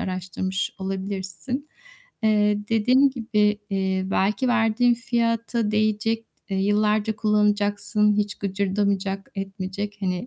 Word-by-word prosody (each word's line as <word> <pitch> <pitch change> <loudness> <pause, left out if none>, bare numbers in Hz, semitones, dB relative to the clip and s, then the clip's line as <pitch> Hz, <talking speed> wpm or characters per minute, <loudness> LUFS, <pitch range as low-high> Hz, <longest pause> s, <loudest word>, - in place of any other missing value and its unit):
araştırmış 185 +1 -3
olabilirsin. 195 - -4 0.6
Eee, 210 -1 +3
dediğim 250 +5 +4
gibi, 210 -4 +1
eee, 190 -1 0
belki 205 +6 +1
verdiğin 240 0 +3
fiyata 230 -2 0
değecek, 215 +1 +1 0.3
eee, 195 - 0
yıllarca 210 +2 +1
kullanacaksın, 210 0 +2
hiç 205 -1 0
gıcırdamayacak, 195 0 -1
etmeyecek, 195 +1 -4
hani, 185 +3 -2
210 Hz, 100 wpm, -24 LUFS, 195-225 Hz, 0.6 s, dediğim